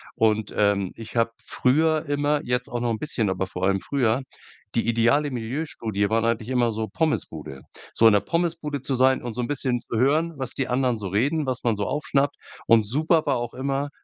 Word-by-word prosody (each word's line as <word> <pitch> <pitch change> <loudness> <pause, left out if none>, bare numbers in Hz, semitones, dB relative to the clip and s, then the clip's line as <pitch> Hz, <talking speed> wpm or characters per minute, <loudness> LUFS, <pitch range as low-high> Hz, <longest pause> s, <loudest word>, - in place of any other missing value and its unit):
Und, 110 -1 +1
ähm, 100 -2 +2
ich 115 0 -10
habe 115 0 +2
früher 155 +4 +1
immer, 145 +1 +1
jetzt 125 +1 -1
auch 120 - -3
noch 120 - 0
'n 110 - -2
bisschen, 115 -8 0
aber 95 0 -1
vor 90 -1 -6
allem 95 0 +2
früher, 125 +2 +1 0.5
die 115 - +2
ideale 120 +6 +2
Milieustudie 115 -4 -2
war 115 +1 +1
eigentlich 115 0 -1
immer 125 -2 +2
so 110 0 -3
Pommesbude. 80 - -3 0.3
So 115 - +5
in 110 - +6
'ner 100 - +4
Pommesbude 165 - -2
zu 135 0 -2
sein 130 +1 +3
und 120 -2 -4
so 125 - -2
'n 120 - -2
bisschen 130 -4 0
zu 115 - -4
hören, 155 +6 +2
was 130 -3 -4
die 135 - 0
anderen 125 -1 +1
so 105 -2 -5
reden, 140 - +1
was 130 -1 -2
man 115 -2 +2
so 100 0 -2
aufschnappt. 140 0 0 0.3
Und 115 -2 +5
super 155 +7 +2
war 140 - +2
auch 120 0 -4
immer 140 +2 -2
125 Hz, 210 wpm, -24 LUFS, 110-145 Hz, 0.5 s, in